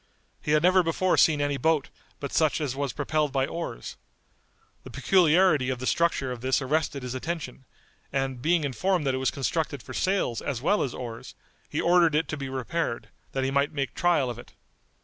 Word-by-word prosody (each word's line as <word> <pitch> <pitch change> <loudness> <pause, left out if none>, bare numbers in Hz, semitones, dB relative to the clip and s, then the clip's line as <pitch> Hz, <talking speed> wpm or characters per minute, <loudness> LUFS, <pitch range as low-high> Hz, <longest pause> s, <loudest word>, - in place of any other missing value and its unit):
He 150 - 0
had 155 +1 +3
never 185 +1 +5
before 175 +2 +1
seen 150 -3 +4
any 145 -1 0
boat 160 -1 +1 0.3
but 140 - -5
such 155 -1 +2
as 140 -4 -2
was 140 -1 -2
propelled 145 +4 -1
by 135 -1 +1
oars. 165 - -6 0.9
The - - -10
peculiarity 170 -6 +3
of 130 - -1
the 130 - -6
structure 160 -4 +1
of 120 -2 -6
this 130 +1 +1
arrested 140 0 -1
his 125 -1 -4
attention, 130 -2 -5 0.5
and 135 -2 -2
being 165 +3 +2
informed 150 - 0
that 135 - +1
it - - -1
was 130 - +2
constructed 140 -1 -2
for - - -9
sails 185 - 0
as 135 -5 -3
well 200 - +2
as 130 - -2
oars, 115 -2 -7 0.3
he - - -2
ordered 170 -3 +4
it 160 +2 +1
to - - -2
be 135 -2 -5
repaired, 130 0 -3 0.2
that 135 - -1
he 135 - 0
might 140 +1 +1
make 140 -2 -2
trial 170 -7 +2
of 120 -1 -5
it. - - -13
145 Hz, 200 wpm, -27 LUFS, 130-165 Hz, 0.9 s, never